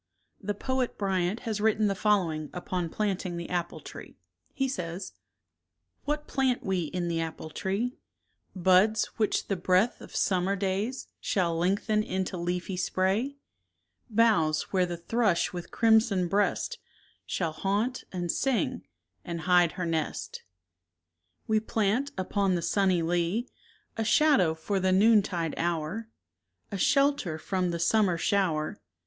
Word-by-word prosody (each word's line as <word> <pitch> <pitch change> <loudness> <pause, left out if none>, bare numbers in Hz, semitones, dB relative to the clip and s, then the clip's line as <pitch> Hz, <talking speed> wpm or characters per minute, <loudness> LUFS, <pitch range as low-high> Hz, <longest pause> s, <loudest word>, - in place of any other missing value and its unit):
The 205 +1 -2
poet 260 +3 -2
Bryant 190 0 0
has 220 -3 -3
written 215 0 +3
the 200 - +2
following 180 -7 +1
upon 180 -1 -3
planting 190 -3 -2
the 170 +1 -6
apple 175 -1 -2
tree. - - -11 0.3
He 270 0 -1
says: 180 -6 -5 0.9
What 300 +1 -1
plant 260 -2 0
we 190 -4 0
in 175 +2 -3
the 165 -1 -1
apple 160 -1 -6
tree? 205 +10 -2 0.6
Buds 190 +4 +4
which 215 -2 0
the 195 - 0
breath 185 +5 +2
of - - -11
summer 190 +1 +1
days 200 +6 -2
Shall 175 -4 0
lengthen 200 +5 +1
into 190 -2 -2
leafy 180 +2 -3
spray; 195 +9 0 0.7
Boughs 205 -10 +2
where 185 -2 +3
the 175 -1 -4
thrush 200 0 +1
with 175 -1 -6
crimson 220 -5 +3
breast 205 - 0 0.5
Shall 165 -3 -1
haunt, 205 +9 -1
and 175 -2 -1
sing, 270 -3 0 0.4
and 170 -2 -5
hide 175 -1 +4
her 180 - -3
nest; 160 -2 -3 1.0
26 - - -39
We 220 0 +3
plant, 220 +5 0
upon 190 0 +1
the 170 - -2
sunny 190 -3 +2
lea, 175 +8 0 0.5
A 225 - 0
shadow 220 - +4
for 195 +5 -2
the 185 0 +2
noontide 195 -5 +3
hour, 170 +6 -2 0.6
A 200 - -3
shelter 275 - +2
from 180 +3 -1
the 170 - -2
summer 180 +1 +2
shower. 165 -5 0
190 Hz, 140 wpm, -28 LUFS, 175-220 Hz, 1.0 s, Buds